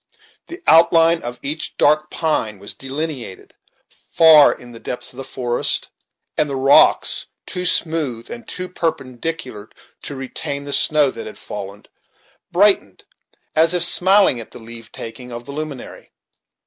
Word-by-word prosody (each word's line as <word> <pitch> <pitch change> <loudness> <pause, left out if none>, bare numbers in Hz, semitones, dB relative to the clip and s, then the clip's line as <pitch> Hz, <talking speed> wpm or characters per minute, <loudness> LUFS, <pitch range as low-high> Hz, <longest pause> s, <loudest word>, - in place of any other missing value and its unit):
The 350 +2 -10
outline 165 0 +5
of 120 0 -6
each 155 +3 -4
dark 155 +1 +3
pine 130 -10 -1
was 100 +1 -7
delineated 135 -6 -6 0.6
far 160 -3 +7
in 120 0 -10
the 115 - -11
depths 125 - -5
of - - -17
the 135 - -5
forest, 120 -2 -2 0.5
and 150 - +1
the 140 - -3
rocks, 135 +1 +4 0.2
too 180 -1 -5
smooth 155 -10 0
and 235 -1 -9
too 185 0 -5
perpendicular 130 - -4 0.3
to 140 - -7
retain 135 +1 -4
the 140 0 -5
snow 150 -3 +4
that - - -8
had 110 - -9
fallen, 100 0 -8 0.7
brightened, 185 - +2 0.5
as 165 +2 +4
if 175 - +2
smiling 190 -5 +4
at 115 - -9
the - - -11
leave 115 0 -11
taking 125 +2 -8
of 120 0 -8
the 140 - -8
luminary. 150 -3 -8
140 Hz, 150 wpm, -19 LUFS, 120-165 Hz, 0.7 s, far